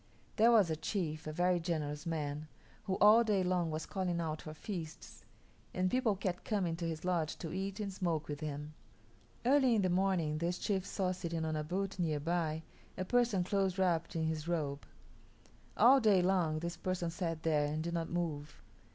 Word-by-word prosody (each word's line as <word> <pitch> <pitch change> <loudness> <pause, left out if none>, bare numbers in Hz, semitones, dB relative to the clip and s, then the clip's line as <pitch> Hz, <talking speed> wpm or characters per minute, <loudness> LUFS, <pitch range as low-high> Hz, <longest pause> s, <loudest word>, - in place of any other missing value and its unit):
There 225 +1 +6
was 205 -8 +5
a - - +1
chief, 155 -3 -3
a - - -2
very 175 +2 +2
generous 155 -2 -3
man, 150 -2 -3 0.4
who 190 -3 0
all 215 +3 +7
day 205 -4 +2
long 180 -2 +1
was 155 0 -3
calling 180 -3 -2
out 155 -2 -3
for 155 - -7
feasts, 165 -3 -7 0.5
and 185 0 +1
people 250 -5 +2
kept 185 -2 -3
coming 185 -6 0
to 170 -1 -3
his 160 +1 -5
lodge 170 -4 0
to 165 -2 -6
eat 195 +2 -3
and 200 -2 -3
smoke 170 -5 -1
with 145 -1 -4
him. 150 -1 -5 0.7
Early 260 -2 +5
in 205 - +2
the 185 - +2
morning 180 -5 +1
this 175 +2 -1
chief 195 -2 -1
saw 185 -2 -1
sitting 170 -3 -3
on 155 0 -1
a 155 - -1
butte 190 +4 -3
near 155 -4 0
by 160 0 -1 0.3
a 185 - -2
person 235 -4 +2
close 195 0 0
wrapped 175 -3 +1
in 160 - 0
his 160 0 -2
robe. 145 -5 -2 0.9
All 255 +5 +7
day 205 -6 +4
long 180 -4 +2
this 170 +2 -4
person 180 -2 -2
sat 165 -2 -3
there 150 -2 +2
and 155 +1 -2
did 170 +1 -3
not 165 -1 -2
move. 155 -4 -3
175 Hz, 195 wpm, -34 LUFS, 155-190 Hz, 0.9 s, all